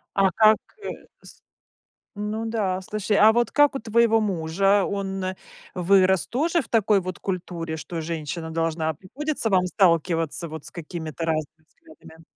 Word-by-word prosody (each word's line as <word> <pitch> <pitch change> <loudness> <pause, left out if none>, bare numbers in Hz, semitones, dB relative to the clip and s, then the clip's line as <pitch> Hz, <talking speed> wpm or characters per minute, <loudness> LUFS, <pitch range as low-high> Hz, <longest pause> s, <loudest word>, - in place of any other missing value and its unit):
А 195 -1 +4
как, 215 +3 +5 0.3
э, - - -4 0.3
с - - -14 0.8
Ну 215 +2 -3
да, 205 -5 -1
слушай, 210 +1 -1
а 215 +2 +7
вот 240 +1 +1
как 290 -1 +4
у - - -1
твоего 225 0 +3
мужа? 195 +1 +1
Он 195 -1 -3 0.5
вырос 185 0 +3
тоже 330 +7 +1
в 230 - -12
такой 215 -3 +3
вот 185 0 -6
культуре, 175 -3 -4
что 165 +1 -6
женщина 160 0 -5
должна 160 -1 -1
Приходится 255 - -3
вам 185 -2 +3
сталкиваться 170 -3 +1
вот 160 -1 -8
с - - -9
какими-то 165 -1 -6
разными 155 -1 -3
взглядами? 160 +1 -17
185 Hz, 150 wpm, -24 LUFS, 165-215 Hz, 0.8 s, а